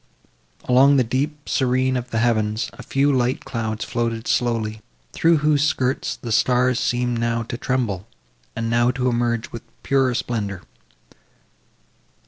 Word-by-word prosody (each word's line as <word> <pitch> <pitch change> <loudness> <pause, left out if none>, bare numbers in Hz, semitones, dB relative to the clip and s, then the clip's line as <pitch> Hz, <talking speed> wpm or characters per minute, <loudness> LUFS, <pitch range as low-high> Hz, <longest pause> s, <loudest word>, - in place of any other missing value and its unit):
Along 135 +3 +5
the 130 - +4
deep 145 +5 -3
serene 130 0 +1
of 125 -1 -3
the 115 - -2
heavens, 110 -1 0
a - - -11
few 140 +1 +1
light 125 0 0
clouds 110 -3 -3
floated 115 -1 -2
slowly, 110 -3 0 0.3
through 165 0 +3
whose 150 -2 +3
skirts 135 -3 0
the 120 - -7
stars 125 +2 +2
now - - -3
seemed 115 -2 -1
to 120 - -3
tremble, 115 -8 -2 0.5
and 115 0 -2
now 120 +1 +2
to 125 0 0
emerge 120 -1 -1
with 115 - -7 0.2
purer 135 -2 +2
splendour. 105 -6 -3
120 Hz, 140 wpm, -22 LUFS, 115-130 Hz, 0.5 s, Along